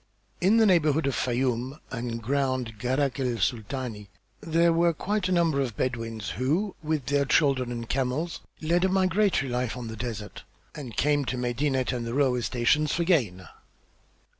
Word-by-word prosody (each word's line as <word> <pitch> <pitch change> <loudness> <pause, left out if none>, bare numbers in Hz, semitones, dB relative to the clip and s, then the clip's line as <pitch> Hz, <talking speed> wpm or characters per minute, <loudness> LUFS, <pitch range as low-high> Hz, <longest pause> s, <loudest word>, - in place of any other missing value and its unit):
In 195 +5 +4
the 225 - +5
neighborhood 160 -5 +3
of 140 - 0
Fayûm 125 +2 -1
and 120 -2 -4
ground 130 -3 -1
Gharak 130 +2 0
el 125 -3 0
Sultani 110 0 -3 0.3
there 165 +1 +2
were 170 0 +3
quite 200 +3 -1
a - - -1
number 165 -5 +2
of 120 -6 -3
Bedouins 115 -7 -3
who 165 +11 -1
with 155 -4 -2
their 140 0 +2
children 135 -3 +2
and 115 -1 -5
camels 135 +7 -1 0.2
led 170 +3 +2
a 190 - +3
migratory 185 -6 +2
life 125 0 -2
on 120 -2 -6
the 110 - -6
desert 110 -3 -6 0.3
and 130 -7 -8
came 145 0 +2
to 125 - -2
Medinet 130 +2 0
and 120 -2 -3
the 115 - -3
railway 130 -3 +2
stations 130 +6 +1
for 170 - 0
gain. 115 - +1
130 Hz, 165 wpm, -27 LUFS, 120-160 Hz, 0.3 s, the